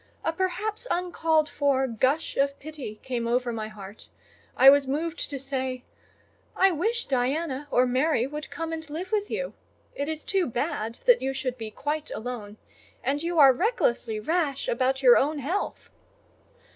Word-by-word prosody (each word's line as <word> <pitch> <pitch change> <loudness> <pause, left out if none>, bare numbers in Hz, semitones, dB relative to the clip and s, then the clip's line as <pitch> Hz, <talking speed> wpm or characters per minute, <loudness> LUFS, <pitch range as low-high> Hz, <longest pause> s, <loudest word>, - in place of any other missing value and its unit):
A 325 - 0
perhaps 420 +6 -2
uncalled 325 -3 +1
for 280 -3 +1
gush 260 +6 0
of 280 0 +1
pity 280 -8 -8
came 245 -3 -2
over 240 0 0
my 220 -1 -4
heart: 205 -1 -11 0.5
I 265 - +7
was 280 0 +8
moved 320 +5 -2
to 285 - -4
say— 260 -2 -3 0.7
"I 385 0 +5
wish 445 +8 0
Diana 275 +2 -1
or 250 -2 +4
Mary 255 0 +2
would 300 +3 -6
come 330 0 -4
and 320 -1 -6
live 345 +6 -5
with 415 -1 0
you: - - -3 0.4
it 285 +2 -3
is 315 -1 -4
too 385 -3 +1
bad 240 -3 -2
that - - +6
you 265 +1 -1
should 260 -2 -3
be 225 -3 -6
quite 295 +7 -3
alone; 220 -3 -6 0.5
and 285 +2 0
you 340 +1 -2
are 275 -3 +8
recklessly 245 - 0
rash 300 +1 -1
about 265 +2 0
your 245 -2 +8
own 300 +3 +1
health." 330 +9 -3
280 Hz, 165 wpm, -26 LUFS, 250-325 Hz, 0.7 s, was